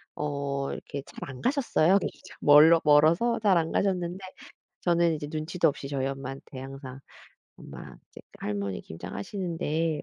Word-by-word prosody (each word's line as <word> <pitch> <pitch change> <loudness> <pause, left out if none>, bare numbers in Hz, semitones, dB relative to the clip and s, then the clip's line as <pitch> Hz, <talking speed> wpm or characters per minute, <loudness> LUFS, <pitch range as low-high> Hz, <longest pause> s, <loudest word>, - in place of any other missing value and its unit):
어 140 -2 -3
이렇게 140 -1 -6
잘 - - -9
안 130 -2 -9
가셨어요. 235 - +3
이게 - - -4
참 - - -14
-멀 155 +3 +7
멀어서 160 +11 +4
잘 200 -4 +4
안 165 0 -2
가셨는데 180 -2 0 0.7
저는 170 -2 +3
이제 150 -1 -5
눈치도 160 +2 0
없이 140 -1 -4
저희 135 -2 -2
엄마한테 135 0 -6
항상 135 0 -9 0.6
"엄마 - - -11
이제 - - -12 0.2
할머니 100 -2 -3
김장 85 +3 -9
하시는데 165 - -2
150 Hz, 315 characters per minute, -27 LUFS, 135-170 Hz, 0.7 s, 멀